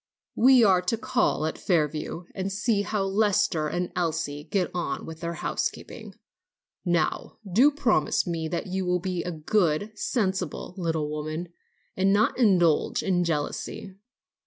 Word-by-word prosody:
We 255 0 +6
are 190 -4 +5
to 205 +5 -1
call 235 -8 0
at 160 - -3
Fairview, 155 -1 -1
and 195 0 -3
see 205 +1 +1
how 205 -1 -1
Lester 200 -4 +1
and 175 +3 -2
Elsie 150 -4 -2
get 180 +2 -1
on 175 -1 -3
with 160 0 -8
their 170 0 -4
housekeeping. - - -4 0.7
Now, 170 -3 -1
do 230 +10 +5
promise 245 - +1
me 165 -2 -2
that 170 +2 -3
you 190 0 -2
will 180 0 +1
be 180 -1 -2
a - - -4
good, 170 +3 0
sensible 195 -5 -2
little 165 -5 -1
woman, 155 +3 -4 0.5
and 190 +1 +2
not 215 +5 +2
indulge 175 -9 +3
in 180 -2 +1
jealousy." 165 +4 -3
180 Hz, 145 wpm, -26 LUFS, 160-205 Hz, 0.7 s, We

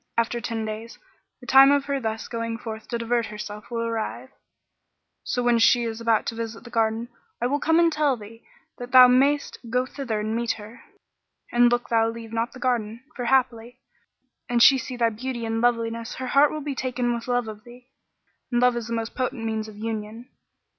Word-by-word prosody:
After 235 +1 0
ten 225 -2 -3
days, 220 +2 -7 0.4
the - - -12
time 270 +2 +7
of 285 -1 +2
her 280 -1 -1
thus 220 -2 -4
going 230 -1 -4
forth 220 -2 -8
to 235 - -2
divert 230 0 0
herself 210 0 -8
will 235 -1 -3
arrive; 230 +3 -4 0.9
so 245 - -2
when 240 -1 +3
she 240 +1 +5
is 225 0 -4
about 230 -2 +2
to - - -3
visit 225 0 -6
the 240 - -12
garden, 225 0 0 0.3
I 240 - -1
will 285 +4 0
come 320 +2 +2
and 335 -1 +4
tell 295 -4 +1
thee, 225 +2 -13 0.4
that 245 +1 -8
thou 255 -1 +10
mayst 275 +4 +2
go 250 +2 +1
thither 250 -5 -4
and 215 +1 -2
meet 235 0 0
her. 215 +3 -12 0.7
And 240 0 +4
look 240 0 0
thou 225 -1 +3
leave 230 -1 -8
not 230 +1 -2
the 255 - -11
garden, 235 -2 -1
for 245 - -4
haply, 240 -1 0 0.7
an 245 - +1
she 265 +3 +7
see 250 +1 -6
thy 230 -1 +3
beauty 240 +1 -5
and 225 0 -1
Loveliness, 230 -1 0
her 260 - -5
heart 280 +3 +4
will 310 - -5
be 290 -1 -3
taken 250 -2 -1
with 235 0 -5
love 245 -2 0
of 215 0 -9
thee, 245 +1 -16 0.6
and 240 - +2
love 250 0 +4
is 235 -2 -4
the 235 - -4
most 225 0 -3
potent 255 -2 -3
means 220 -1 -2
of 215 -1 -12
union." 220 +2 -5
235 Hz, 210 wpm, -24 LUFS, 225-250 Hz, 0.9 s, thou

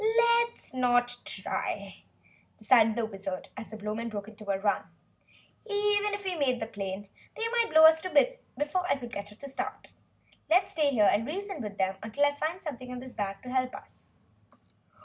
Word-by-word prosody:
"Let's 470 - +2
not 245 -1 +2
try," - - -4 0.6
decided 220 0 +5
the 235 -1 0
Wizard, 195 -3 -6
as - - -8
the 220 - -8
Blowmen 215 +2 -3
broke 205 -2 -5
into 215 -1 -11
a 195 - +2
run. 205 +1 +1 0.8
"Even 415 -1 +1
if 405 -1 -8
we 375 - 0
made 270 -7 +1
the 220 - -2
plane, 200 -2 -5 0.3
they 455 - 0
might 470 -1 +2
blow 315 0 +8
us 320 0 +7
to 370 - -4
bits - - +3 0.2
before 360 +5 0
I - - +3
could 240 -3 -9
get 200 0 -5
her 210 +7 -11
started. 270 - -5 0.6
Let's 365 +4 +4
stay 305 -3 +2
here 220 -7 +4
and 225 +4 +1
reason 385 0 -4
with 205 -2 -6
them 190 0 0 0.2
till 285 +3 +4
I 285 - +2
find 320 +6 -3
something 255 -5 -6
in 250 0 -5
this 255 0 -10
bag 195 -1 -4
to 250 - -8
help 255 0 0
us." - - -15
255 Hz, 190 wpm, -29 LUFS, 215-355 Hz, 0.8 s, blow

